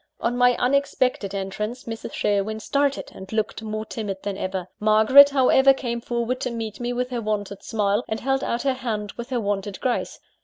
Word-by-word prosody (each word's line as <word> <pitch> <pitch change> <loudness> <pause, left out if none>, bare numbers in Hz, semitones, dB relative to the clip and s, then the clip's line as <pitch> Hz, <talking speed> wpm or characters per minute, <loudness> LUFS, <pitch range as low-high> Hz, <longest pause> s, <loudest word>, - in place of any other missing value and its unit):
On 240 +1 -1
my 245 0 +4
unexpected 255 -6 0
entrance, 210 +5 -4
Mrs. 225 -1 -7
Sherwin 205 +1 0
started, 280 +5 -1
and 190 0 -11
looked 220 0 -2
more 215 0 -4
timid 205 -4 -4
than 200 -1 -3
ever. 185 -2 -4
Margaret, 220 +7 +7
however, 270 0 +5
came 235 -3 -3
forward 240 +1 -2
to 250 - -1
meet 225 -3 -5
me 240 0 -2
with 250 +1 -2
her 240 -2 -2
wonted 205 -2 -3
smile, 210 +1 0
and 220 0 -3
held 270 0 0
out 235 - -1
her 270 -1 +2
hand 220 -5 -4
with 235 +2 -8
her 250 -2 0
wonted 205 -2 -3
grace. 250 -2 -2
225 Hz, 190 wpm, -24 LUFS, 210-250 Hz, -, Margaret